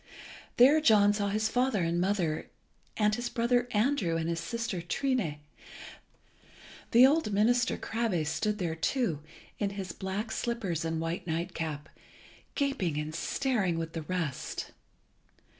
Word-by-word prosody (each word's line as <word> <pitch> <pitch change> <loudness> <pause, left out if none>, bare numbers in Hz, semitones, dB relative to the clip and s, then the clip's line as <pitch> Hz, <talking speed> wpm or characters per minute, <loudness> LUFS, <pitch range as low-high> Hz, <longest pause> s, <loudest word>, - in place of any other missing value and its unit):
There 280 +6 +7
John 205 -6 +5
saw 205 -1 -1
his 215 +2 +1
father 245 -6 +1
and 170 +1 0
mother, 180 -5 0 0.5
and 210 -1 +3
his 240 +2 -2
brother 245 +1 +1
Andrew, 210 -7 +1
and 165 0 -2
his 165 0 -1
sister 230 -4 -3
Trine. 200 - -1 1.5
The 245 +2 +7
old 285 -4 +3
minister 240 +4 +2
Krabbe 220 -8 -1
stood 210 +7 -1
there 175 -5 -2
too, 165 - -1 0.4
in 205 - 0
his 195 -3 -5
black 195 +5 -4
slippers 220 -9 -2
and 165 0 -2
white 165 +2 -3
nightcap, 160 -3 -3 0.7
gaping 270 - 0
and 150 +1 -3
staring 190 - 0
with 165 0 -4
the 165 - -3
rest. 165 -4 -4
200 Hz, 135 wpm, -30 LUFS, 165-235 Hz, 1.5 s, There